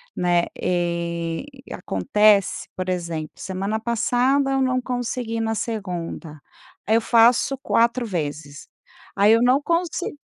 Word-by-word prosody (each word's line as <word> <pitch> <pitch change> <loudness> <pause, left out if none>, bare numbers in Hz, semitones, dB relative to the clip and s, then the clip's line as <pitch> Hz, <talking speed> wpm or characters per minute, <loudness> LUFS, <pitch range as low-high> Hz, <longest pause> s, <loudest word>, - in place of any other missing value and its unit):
né. 175 -1 +2 0.2
E 170 -1 -2 0.3
acontece, 200 - +2
por 185 0 -4
exemplo, 170 -4 -3
semana 195 +3 -3
passada, 250 +4 +1
eu 270 0 +1
não 255 -1 +1
consegui 245 -2 -3
na 225 0 -1
segunda, 180 -8 -5 0.5
aí 220 - +1
eu 230 - +3
faço 235 +4 +4
4 235 -1 +1
vezes, 145 -6 -5 0.5
aí 205 +2 +5
eu 230 - +4
não 250 +3 +4
consi 340 0 -1
215 Hz, 125 wpm, -22 LUFS, 175-245 Hz, 0.5 s, aí